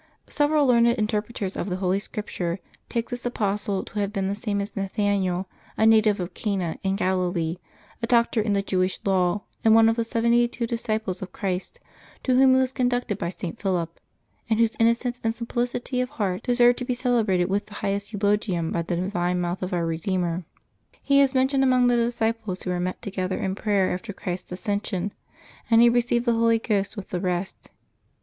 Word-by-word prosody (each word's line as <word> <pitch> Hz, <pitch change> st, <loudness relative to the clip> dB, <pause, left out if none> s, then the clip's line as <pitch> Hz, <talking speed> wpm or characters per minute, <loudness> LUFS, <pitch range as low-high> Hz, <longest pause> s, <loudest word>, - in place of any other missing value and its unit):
Several 295 Hz, 0 st, +2 dB
learned 235 Hz, -2 st, +5 dB
interpreters 210 Hz, -2 st, -2 dB
of 195 Hz, -, -3 dB
the 180 Hz, -, -1 dB
Holy 185 Hz, +1 st, 0 dB
Scripture 195 Hz, -4 st, -4 dB, 0.3 s
take 235 Hz, +1 st, -2 dB
this 245 Hz, 0 st, -4 dB
apostle 205 Hz, -4 st, -1 dB
to 210 Hz, -, -6 dB
have 200 Hz, -1 st, -1 dB
been 195 Hz, -2 st, -1 dB
the -, -, 0 dB
same 205 Hz, -1 st, -2 dB
as 200 Hz, +1 st, -4 dB
Nathaniel, 195 Hz, -2 st, 0 dB, 0.3 s
a 220 Hz, -, +3 dB
native 215 Hz, -2 st, +5 dB
of 180 Hz, 0 st, -4 dB
Cana, 190 Hz, -6 st, -2 dB
in 195 Hz, -1 st, 0 dB
Galilee, 180 Hz, -3 st, 0 dB, 0.4 s
a 230 Hz, -, -1 dB
doctor 235 Hz, -1 st, +3 dB
in 210 Hz, -1 st, 0 dB
the 200 Hz, 0 st, +1 dB
Jewish 185 Hz, -1 st, 0 dB
law, 190 Hz, 0 st, +1 dB, 0.2 s
and 220 Hz, 0 st, +6 dB
one 225 Hz, 0 st, +7 dB
of 225 Hz, +1 st, +2 dB
the 230 Hz, -, +1 dB
seventy 235 Hz, +1 st, +2 dB
two 240 Hz, 0 st, -3 dB
disciples 220 Hz, -5 st, -2 dB
of 185 Hz, -1 st, -6 dB
Christ, 190 Hz, -, -3 dB, 0.4 s
to 255 Hz, -, +2 dB
whom 260 Hz, 0 st, +6 dB
he -, -, +4 dB
was 260 Hz, -1 st, +1 dB
con 255 Hz, -2 st, +1 dB
ducted 245 Hz, -5 st, -2 dB
by 170 Hz, -, -2 dB
St. 175 Hz, -2 st, -6 dB
Philip, 175 Hz, -4 st, -1 dB, 0.5 s
and 220 Hz, 0 st, +2 dB
whose 230 Hz, -1 st, +2 dB
innocence 235 Hz, +2 st, +1 dB
and 225 Hz, 0 st, 0 dB
simplicity 245 Hz, +2 st, -2 dB
of 250 Hz, -, -2 dB
heart 200 Hz, -9 st, -2 dB
deserved 245 Hz, 0 st, +4 dB
to 250 Hz, -, -3 dB
be 250 Hz, -1 st, -1 dB
celebrated 225 Hz, -8 st, +2 dB
with 200 Hz, +3 st, -1 dB
the 205 Hz, -, -12 dB
highest 200 Hz, +1 st, -2 dB
eulogium 205 Hz, -5 st, 0 dB
by 170 Hz, -, 0 dB
the 170 Hz, +1 st, -2 dB
divine 180 Hz, 0 st, -1 dB
mouth 175 Hz, +1 st, -2 dB
of 185 Hz, -, -3 dB
Our 175 Hz, -2 st, 0 dB
Redeemer. 170 Hz, +1 st, -1 dB, 0.6 s
He 280 Hz, 0 st, +4 dB
is 275 Hz, -1 st, +2 dB
mentioned 265 Hz, +1 st, +3 dB
among 255 Hz, -1 st, +4 dB
the 245 Hz, 0 st, +4 dB
disciples 225 Hz, -4 st, -1 dB
who 180 Hz, -, -2 dB
were 180 Hz, -, -1 dB
met 180 Hz, +1 st, -3 dB
together 185 Hz, -1 st, -2 dB
in 190 Hz, -, -2 dB
prayer 200 Hz, -2 st, +1 dB
after 200 Hz, +4 st, -5 dB
Christ's 180 Hz, -1 st, -5 dB
ascension, 200 Hz, 0 st, -2 dB, 0.6 s
and 225 Hz, -1 st, +6 dB
he 235 Hz, 0 st, +7 dB
received 240 Hz, 0 st, +1 dB
the 235 Hz, -, +3 dB
Holy 230 Hz, 0 st, +3 dB
Ghost 210 Hz, -1 st, -1 dB
with 200 Hz, -, -7 dB
the 180 Hz, -, -2 dB
rest. 180 Hz, 0 st, -3 dB
205 Hz, 200 wpm, -25 LUFS, 185-235 Hz, 0.6 s, one